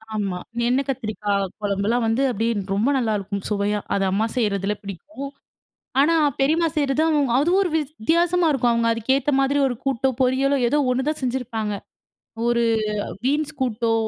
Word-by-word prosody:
ஆமா 195 -4 -2 0.3
எண்ணெய் 260 +2 +1
கத்திரிக்காய் 210 -5 -1 0.2
குழம்புலாம் 205 +4 0
வந்து 225 +4 +1
அப்டியே 230 +1 0 0.2
ரொம்ப 215 +7 +1
நலலாயிருக்கும் 205 -5 -2
சுவையா, 205 0 0
அது 195 - +1
அம்மா 205 +4 +1
செய்றதில 205 -3 0
பிடிக்கும். 275 - -7 0.7
ஆனா 325 +4 +4 0.2
பெரியம்மா 320 +5 +3
செய்றது 285 0 +1 0.4
அதுவும் 345 +7 +3
ஒரு 365 - -1
வித்தியாசமா 325 +4 +1
இருக்கும் 245 -3 +2
அவங்க 230 0 +1
அதுக்கேத்த 265 +6 +1
மாதிரி 275 +1 +2
ஒரு 245 - -2
கூட்டோ 265 0 +1
பொரியலோ 270 +2 +2
ஏதோ 290 - +2
1 260 +3 -1
தான் 310 - -2
செஞ்சிருப்பாங்க. 235 -4 -2 0.7
ஒரு 235 0 +2 0.6
பீன்ஸ் 295 +3 0
கூட்டோ, 230 -2 0
245 Hz, 140 wpm, -22 LUFS, 210-280 Hz, 0.7 s, ஆனா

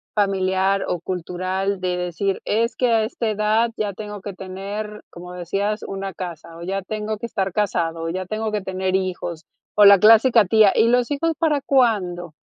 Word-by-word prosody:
familiar 195 -1 +1
o 175 - -2
cultural? 185 +2 -3
De 180 -1 -1
decir: 180 +2 -2
"Es 230 +3 0
que 250 - +1
a 225 -1 +3
esta 225 0 -2
edad 215 +2 +1
ya 205 -2 -2
tengo 210 0 -8
que 200 +1 -6
tener, 200 +3 -6
como 180 +1 -10
decías, 195 +4 -2
una 195 0 -5
casa, 170 -2 -8
o 170 - -9
ya 195 +2 -2
tengo 215 +2 -4
que 235 - -4
estar 195 -4 -2
casado, 170 -5 -1
o - - -2
ya 185 +2 -3
tengo 215 +3 -3
que 210 -1 -1
tener 190 0 -2
hijos", 180 -3 -3 0.3
o 210 - +7
la 200 -1 +9
clásica 225 +2 +6
tía: 210 +1 +5
"¿Y 230 - +4
los 245 +2 +2
hijos 325 +3 0
para 305 -4 +1
cuándo?" 190 - +1
195 Hz, 190 wpm, -22 LUFS, 185-215 Hz, 0.3 s, la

